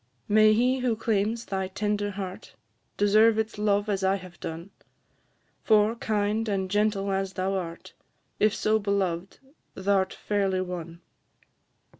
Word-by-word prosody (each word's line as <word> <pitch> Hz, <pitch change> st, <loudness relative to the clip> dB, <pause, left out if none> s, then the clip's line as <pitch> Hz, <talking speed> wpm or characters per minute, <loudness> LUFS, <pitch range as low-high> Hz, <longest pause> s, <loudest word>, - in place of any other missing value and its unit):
May 215 Hz, +1 st, +5 dB
he 250 Hz, +4 st, +2 dB
who 250 Hz, -3 st, +1 dB
claims 220 Hz, +1 st, -1 dB
thy 190 Hz, -1 st, -2 dB
tender 205 Hz, +1 st, -1 dB
heart, 190 Hz, -2 st, -7 dB, 0.4 s
Deserve 215 Hz, +2 st, +4 dB
its 220 Hz, -1 st, -2 dB
love 205 Hz, 0 st, +1 dB
as 200 Hz, -2 st, -1 dB
I 190 Hz, +1 st, +3 dB
have 185 Hz, -2 st, -10 dB
done! 165 Hz, +4 st, -7 dB, 0.9 s
For, 215 Hz, 0 st, +4 dB
kind 215 Hz, -1 st, -1 dB
and 190 Hz, -2 st, -1 dB
gentle 205 Hz, -1 st, +1 dB
as 195 Hz, 0 st, -1 dB
thou 185 Hz, +2 st, -1 dB
art, 170 Hz, -3 st, -5 dB, 0.5 s
If 215 Hz, 0 st, +3 dB
so 215 Hz, +1 st, +2 dB
beloved, 195 Hz, -3 st, -2 dB, 0.4 s
thou 195 Hz, 0 st, +2 dB
'rt 190 Hz, -, -4 dB
fairly 195 Hz, -3 st, 0 dB
won. 175 Hz, -2 st, -6 dB
200 Hz, 140 wpm, -27 LUFS, 190-215 Hz, 0.9 s, May